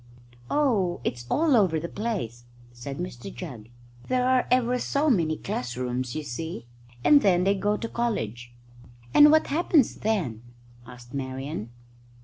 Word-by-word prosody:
"Oh, 215 Hz, -12 st, +1 dB
it's 120 Hz, -1 st, -4 dB
all 310 Hz, -3 st, +3 dB
over 185 Hz, -8 st, +3 dB
the 170 Hz, -, -4 dB
place," 175 Hz, -, -4 dB, 0.3 s
said 135 Hz, +3 st, -7 dB
Mr 180 Hz, -1 st, -6 dB
Jugg; 125 Hz, -, -9 dB, 0.4 s
"there 255 Hz, 0 st, +1 dB
are 255 Hz, -1 st, +3 dB
ever 250 Hz, 0 st, +2 dB
so 290 Hz, +4 st, +1 dB
many 160 Hz, -8 st, +1 dB
class 125 Hz, -1 st, -4 dB
rooms, 125 Hz, +1 st, -3 dB
you 155 Hz, -, -3 dB
see. 145 Hz, -1 st, -6 dB, 0.4 s
And 290 Hz, -1 st, +6 dB
then 180 Hz, -4 st, +3 dB
they 195 Hz, +1 st, +3 dB
go 205 Hz, +2 st, 0 dB
to 230 Hz, -, -4 dB
college." 120 Hz, -, -3 dB, 0.6 s
"And 295 Hz, 0 st, +8 dB
what 315 Hz, +1 st, +5 dB
happens 310 Hz, -4 st, +2 dB
then?" 175 Hz, -, -1 dB, 0.5 s
asked 125 Hz, -1 st, -13 dB
Marian. 130 Hz, -3 st, -4 dB
175 Hz, 145 wpm, -26 LUFS, -, 0.6 s, And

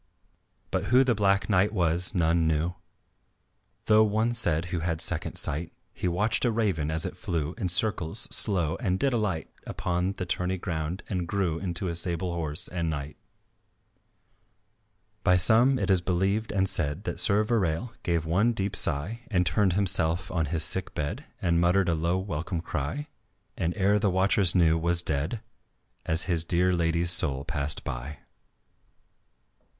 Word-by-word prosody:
But -, -, -1 dB
who 125 Hz, +3 st, +4 dB
the 125 Hz, -2 st, +1 dB
Black 100 Hz, -2 st, +1 dB
Knight 100 Hz, 0 st, +2 dB
was 90 Hz, -3 st, 0 dB
none 85 Hz, -1 st, +2 dB
knew, 80 Hz, +3 st, 0 dB, 1.1 s
Though 110 Hz, 0 st, +5 dB
one 110 Hz, +2 st, 0 dB
said 85 Hz, -8 st, +1 dB
who 85 Hz, -, -1 dB
had 80 Hz, 0 st, -2 dB
second -, -, -3 dB
sight, 80 Hz, +4 st, +3 dB, 0.2 s
He -, -, -3 dB
watched 100 Hz, +6 st, 0 dB
a 120 Hz, -, +2 dB
raven 100 Hz, -10 st, -1 dB
as 80 Hz, 0 st, +1 dB
it -, -, -5 dB
flew 80 Hz, -1 st, -3 dB
In 95 Hz, -, -1 dB
circles 90 Hz, -2 st, 0 dB
slow 85 Hz, -5 st, +3 dB
and 95 Hz, -6 st, -1 dB
did 135 Hz, +5 st, +1 dB
alight 105 Hz, -8 st, -2 dB, 0.2 s
Upon 90 Hz, +2 st, -2 dB
the 95 Hz, -, -5 dB
tourney 90 Hz, +1 st, -2 dB
ground 85 Hz, 0 st, -4 dB
and 90 Hz, -4 st, -3 dB
grew 90 Hz, -4 st, -1 dB
Into 90 Hz, 0 st, -3 dB
a 85 Hz, -, -2 dB
sable 85 Hz, +1 st, -1 dB
horse 80 Hz, -3 st, 0 dB
and 85 Hz, -2 st, -3 dB
knight. 75 Hz, -1 st, -5 dB, 2.1 s
By 90 Hz, -2 st, +4 dB
some, 120 Hz, +8 st, +4 dB
it 100 Hz, -, -1 dB
is 95 Hz, -2 st, +3 dB
believed 95 Hz, +5 st, -1 dB
and 95 Hz, -2 st, 0 dB
said, 75 Hz, +1 st, 0 dB
That -, -, -3 dB
Sir 105 Hz, +1 st, +4 dB
Verale 105 Hz, -2 st, -1 dB
gave 85 Hz, -3 st, -1 dB
one 100 Hz, +9 st, +1 dB
deep 100 Hz, -2 st, -1 dB
sigh 85 Hz, +12 st, -1 dB
And 90 Hz, -5 st, +1 dB
turned 90 Hz, +2 st, +1 dB
himself 85 Hz, -3 st, +1 dB
on 80 Hz, -4 st, -1 dB
his 80 Hz, +1 st, +2 dB
sick 95 Hz, +3 st, +3 dB
bed 85 Hz, -, -4 dB, 0.2 s
And 85 Hz, -1 st, +2 dB
muttered 90 Hz, +1 st, +2 dB
a -, -, +2 dB
low 85 Hz, +3 st, 0 dB
welcome 85 Hz, -2 st, -4 dB
cry, 85 Hz, -, -4 dB, 0.5 s
And 85 Hz, +1 st, -3 dB
ere 100 Hz, +1 st, +2 dB
the 105 Hz, -1 st, +1 dB
watchers 95 Hz, 0 st, +2 dB
knew, 80 Hz, -2 st, +3 dB
was 85 Hz, +1 st, +2 dB
dead, 80 Hz, +9 st, -2 dB, 0.7 s
As 80 Hz, +1 st, +1 dB
his 85 Hz, -3 st, 0 dB
dear 90 Hz, +2 st, +1 dB
lady's 85 Hz, 0 st, +1 dB
soul 70 Hz, -5 st, +2 dB
passed 75 Hz, 0 st, -3 dB
by. 65 Hz, +5 st, -6 dB
90 Hz, 165 wpm, -26 LUFS, 80-100 Hz, 2.1 s, Though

